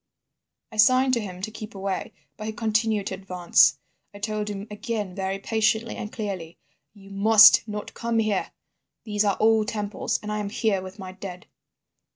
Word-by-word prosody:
"I 215 - -10
signed 255 +4 +5
to 240 - +3
him 185 -4 -7
to 220 - -3
keep 215 0 -9
away, 195 -1 -3 0.2
but 215 - -7
he 220 - -3
continued 215 -1 0
to - - -3
advance. 175 -6 +3 0.4
I - - -8
told 210 0 -3
him 200 -1 -5
again 210 -3 -4
very 190 +1 -3
patiently 220 +2 0
and 215 - -6
clearly: 190 -7 -5 0.4
'You 195 -1 -15
must 215 +2 +7
not 210 -1 -6
come 230 0 -2
here. 215 -3 0 0.5
These 210 -1 0
are 200 - +1
old 220 -1 +3
temples 210 -3 -2
and 210 - -4
I 210 - -2
am 205 -1 -3
here 205 -2 0
with 185 +1 -10
my 190 -2 -8
dead. 185 -1 -9
210 Hz, 180 wpm, -25 LUFS, 195-220 Hz, 0.5 s, must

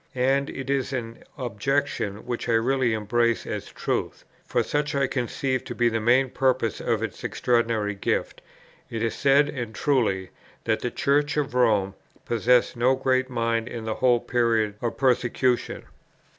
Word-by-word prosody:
And 135 +2 +1
it 135 -1 -6
is 135 -1 -1
an 115 -3 -5
objection 125 -3 -2
which 120 0 -4
I - - +3
really 120 +1 +2
embrace 115 +2 +1
as - - -5
a - - -18
truth; - - -3 0.2
for - - 0
such 145 0 -1
I 140 0 +2
conceive 130 0 -2
to - - -6
be 120 -1 +3
the 115 0 -1
main 125 +4 +3
purpose 130 -4 +1
of - - 0
its - - -5
extraordinary 115 -4 0
gift. 100 - -2 0.5
It 115 -1 -3
is 115 - 0
said, 140 +1 +4
and 120 -6 -5
truly, 105 -11 0 0.3
that - - 0
the - - -2
Church 145 +2 +1
of 145 -2 -1
Rome 105 -6 +2 0.3
possessed 120 +2 +2
no 125 +3 +3
great 130 0 +1
mind 115 -2 -1
in 115 -2 -6
the 110 - -1
whole 125 -2 +4
period 115 -3 +1
of 120 - -2
persecution. 125 -1 +1
120 Hz, 165 wpm, -25 LUFS, 115-135 Hz, 0.5 s, said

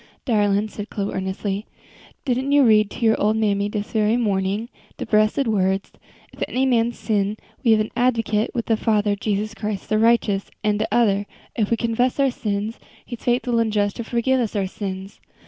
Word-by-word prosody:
"Darlin'," 205 -3 +2
said 210 0 -7
Chloe, 200 -2 -3
earnestly, 195 +2 -3 0.6
"didn't 260 +1 0
you 285 -1 +6
read 215 -3 +5
to 230 - -3
your 220 - +3
ole 215 +1 +3
mammy 205 -2 +1
dis 210 -1 -4
very 220 +1 +2
morning 200 -1 0 0.3
dese - - -5
bressed 215 +6 +2
words: 195 -2 0 0.4
'If - - -16
any 260 +1 0
man 235 -2 +2
sin, 210 -3 -1 0.3
we 240 - +2
have 215 - +3
an 215 - -3
advocate 230 -3 +1
with 235 - -1
the 225 - +2
Father, 210 -2 +1
Jesus 210 +1 -2
Christ 210 -2 -5
the 215 - +2
righteous,' 225 -3 +2
an' 210 -1 +2
de 215 - -1
other: 205 -4 +2 0.3
'If 215 -3 0
we 230 - +2
confess 240 +4 0
our 275 -1 +3
sins, 210 -1 -3 0.3
He 240 - -6
is 230 - -19
faithful 240 -1 +1
and 225 -1 +1
just 205 -1 0
to 235 - -3
forgive 240 +3 +1
us 230 -3 -2
our 200 -2 +1
sins.' 190 0 -6
215 Hz, 195 wpm, -22 LUFS, 205-235 Hz, 0.6 s, you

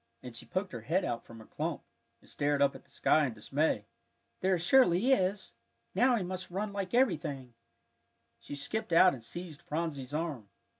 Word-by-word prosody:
and 125 -2 -8
she - - -7
poked 185 +1 -2
her 115 - -6
head 170 - 0
out 115 -1 -3
from 115 - -13
her 110 - -12
clump, - - -4 0.4
and - - -20
stared 145 0 0
up 140 0 +4
at - - -12
the - - -27
sky 150 +1 +3
in 120 - -6
dismay. 115 0 0 0.5
"There 185 0 +2
surely 190 +4 +4
is! 190 -5 +1 0.4
Now 245 +6 +4
we 215 - -1
must 185 +1 -5
run 200 +4 -2
home - - -11
like 195 0 -3
everything." 145 - 0 0.9
She 145 - -8
skipped 165 +7 -1
out 180 +2 +7
and 120 - -9
seized 165 +5 -6
Phronsie's 150 -5 -3
arm. 150 -9 -3
165 Hz, 190 wpm, -31 LUFS, 140-190 Hz, 0.9 s, out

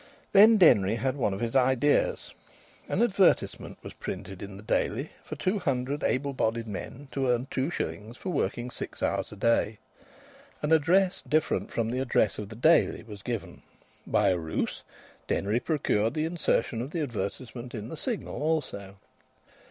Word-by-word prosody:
Then 215 +3 +8
Denry 105 - +5
had 130 +3 -1
one 120 -7 0
of 95 - -4
his 115 +2 -2
ideas. 130 +2 +2 0.6
An 220 - +2
advertisement 200 -5 +2
was - - -8
printed 95 0 -7
in 100 -1 -7
the 100 - -11
Daily 125 +5 -1
for - - -6
two 195 +3 0
hundred 140 -3 -1
able 140 +2 0
bodied 115 -2 0
men 120 +7 -7
to 135 -1 -1
earn 120 +1 +1
two 135 +3 0
shillings 115 -7 -4
for 185 - -4
working 125 -7 -1
six - - -6
hours - - -1
a - - -8
day. 110 0 +1 0.9
An 150 - 0
address 180 +5 +3
different 155 0 0
from 115 0 -1
the 125 - -1
address 125 -4 +1
of 105 -2 -6
the 110 - -9
Daily 155 +4 +3
was 105 -3 -10
given. 115 -1 -5 0.5
By 105 -2 +3
a 90 -2 +1
ruse 80 -1 -3 0.5
Denry 105 +4 +1
procured 120 -7 0
the 155 0 0
insertion 155 -8 0
of 130 - -4
the 165 +1 -3
advertisement 120 +1 -5
in 110 +1 -6
the - - -6
Signal 225 - -3
also. 130 -11 -2
125 Hz, 165 wpm, -28 LUFS, 110-155 Hz, 0.9 s, Then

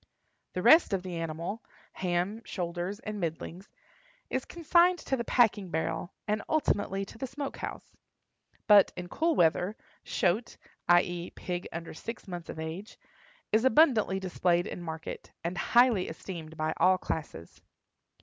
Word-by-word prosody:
The - - -3
rest 320 -9 +7
of 190 -2 0
the 180 -2 -5
animal—ham, 175 +3 -4
shoulders, 175 +2 -4
and 210 -1 -5
middlings—is 195 - -6
consigned 345 +2 +3
to 270 - -2
the 235 - -2
packing 220 -6 +3
barrel, 160 +2 -2 0.2
and 210 0 0
ultimately 205 -10 +1
to 225 - -13
the 265 - -3
smoke 275 +2 -5
house. - - -7 0.7
But, 205 -2 +7
in 175 0 -6
cool 325 - +1
weather, 180 +4 +2 0.3
"shoat"—i. 175 -2 +1
e., 175 0 -5
pig 180 -1 -4
under 170 0 -6
six 230 +7 -7
months 175 -3 -7
of - - -6
age—is 210 - -5
abundantly 240 -7 +4
displayed 180 -1 +1
in - - -6
market, 160 -1 -7
and 170 +2 -2
highly 235 -1 +4
esteemed 160 -1 -8
by 155 0 0
all 185 0 +5
classes. 150 - -6
190 Hz, 135 wpm, -29 LUFS, 170-230 Hz, 0.7 s, rest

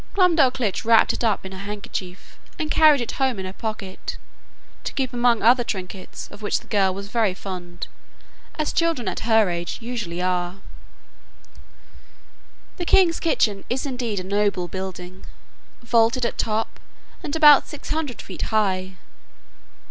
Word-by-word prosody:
Glumdalclitch 270 - +3
wrapped 225 0 +5
it - - -4
up 215 -4 +1
in 190 - -7
her 190 - -8
handkerchief, 200 -2 -7 0.2
and 315 -3 -3
carried 305 -4 +6
it 235 - -3
home 260 -4 +2
in 190 - -4
her 185 - -6
pocket, 210 -3 -5 0.7
to - - -4
keep 260 -2 -2
among 240 -1 +2
other 245 +2 +5
trinkets, 190 -3 -6
of 205 - -12
which 205 - 0
the - - -19
girl 195 -2 +2
was 200 +1 -7
very 215 -4 +1
fond, 175 -3 -7 0.7
as 305 -1 -1
children 330 -8 +1
at - - -2
her 220 -2 +5
age 170 0 -4
usually 230 -8 -4
are. 180 +1 -1 2.2
The 350 - -3
king's 340 -2 +4
kitchen 210 -11 +1
is 260 +4 -1
indeed 245 -6 -2
a - - -5
noble 200 -2 0
building, 185 0 -7 0.6
vaulted 235 +1 +3
at - - -3
top, 220 0 -1 0.4
and 290 - -4
about 295 -3 +7
six 295 - -9
hundred 300 -5 -3
feet - - -8
high. 190 -4 0
220 Hz, 150 wpm, -23 LUFS, 190-255 Hz, 2.2 s, about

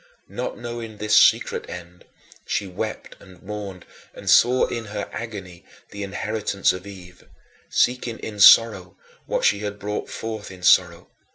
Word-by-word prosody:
Not - - -4
knowing 120 -2 -7
this 105 0 +1
secret - - +3
end, 90 0 -10 0.4
she 100 - -1
wept 90 -2 -6
and 90 -2 -16
mourned 100 -2 -7 0.3
and - - -11
saw 125 +2 +5
in 115 -2 -5
her 105 -1 -5
agony 95 -6 -7 0.3
the 100 - -7
inheritance 100 0 -1
of 90 +2 -8
Eve 90 -2 -13 0.4
seeking 125 -2 0
in 105 -2 -8
sorrow 100 -3 +6 0.3
what - - -1
she 100 - +3
had 105 -1 -5
brought 105 +1 -4
forth 110 -2 -6
in 90 -1 -12
sorrow. 90 -1 +3
100 Hz, 150 wpm, -23 LUFS, 90-110 Hz, 0.4 s, sorrow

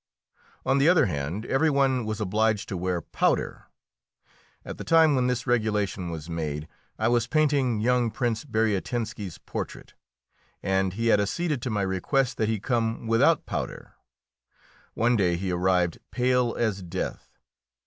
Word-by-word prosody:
On 135 +1 +3
the 145 +4 +5
other 180 -1 +5
hand, 85 +5 -3
every 155 +4 +2
one 135 -4 +2
was 110 0 -3
obliged 110 +1 +1
to 95 - -3
wear 90 -1 -2
powder. - - -1 1.0
At - - -7
the - - -4
time 160 -2 +5
when 125 -2 +2
this 125 -1 -1
regulation 105 -7 0
was 80 -2 -6
made 80 -2 -4 0.3
I 110 - +1
was 120 -1 +2
painting 140 -6 +2
young 125 0 +2
Prince 115 -1 -1
Bariatinski's 110 - -2
portrait, - - -7 0.7
and 95 -1 +1
he 115 +3 0
had 105 - +4
acceded 150 - -1
to 125 - -3
my 105 -3 0
request 105 +8 0
that 110 - 0
he 110 -2 0
come 115 +1 -1
without 115 0 +3
powder. - - -5 1.0
One 120 +2 +2
day 90 -5 +2
he 95 +1 -2
arrived 90 -1 +1
pale 125 -1 +1
as 110 -4 0
death. 90 +1 -5
110 Hz, 150 wpm, -26 LUFS, 95-125 Hz, 1.0 s, the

